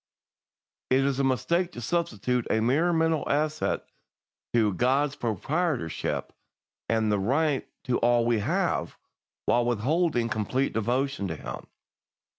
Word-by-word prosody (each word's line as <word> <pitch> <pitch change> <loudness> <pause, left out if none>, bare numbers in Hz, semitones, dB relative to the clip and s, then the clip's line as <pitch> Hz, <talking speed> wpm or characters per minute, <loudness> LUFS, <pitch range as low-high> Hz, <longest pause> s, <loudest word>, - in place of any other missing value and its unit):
"It 130 +1 +4
is 140 -1 0
a - - +2
mistake 170 +7 +1
to - - -7
substitute 125 - -1
a 110 - +2
mere 140 +10 +2
mental 160 -2 +2
assent 155 +1 0 0.7
to 110 -4 +3
God's 135 +7 +1
proprietorship 125 - -2 0.6
and 105 -3 +1
right 145 +1 +1 0.2
to 125 - 0
all 120 0 +3
we 120 -2 +2
have, 100 - -1 0.5
while 120 0 +3
withholding 120 +3 +1
complete 115 +5 -1
devotion 120 0 0
to 80 - -4
Him. - - -7
125 Hz, 120 wpm, -27 LUFS, 115-150 Hz, 0.7 s, It